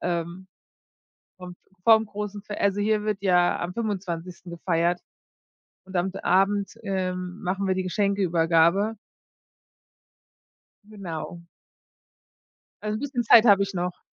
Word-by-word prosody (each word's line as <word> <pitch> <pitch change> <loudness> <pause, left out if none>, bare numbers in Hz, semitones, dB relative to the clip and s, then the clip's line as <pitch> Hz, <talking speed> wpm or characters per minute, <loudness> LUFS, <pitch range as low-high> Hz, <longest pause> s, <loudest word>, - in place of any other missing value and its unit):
ähm, 175 +2 -3 0.9
vo 180 -1 -9 0.3
vorm 225 -1 +6
großen 205 0 -6
Fes 210 0 -7
also 200 0 +1
hier 210 0 +1
wird 210 -2 -2
ja 180 -2 +3
am 175 +1 -4
25. 180 -5 -4
gefeiert 170 0 0 0.9
und 190 0 -11
am 180 +2 0
Abend, 195 +1 +2
ähm, 185 -1 -3
machen 195 +1 -2
wir 190 - +2
die 185 - -1
Geschenkeübergabe. 185 +1 +2 1.9
Genau. 175 -4 -7 1.4
Also 215 0 -2
bisschen 275 -3 -2
Zeit 230 0 +7
habe 200 -2 +6
ich 195 0 -4
noch. 180 0 -3
190 Hz, 115 wpm, -25 LUFS, 175-205 Hz, 1.9 s, Zeit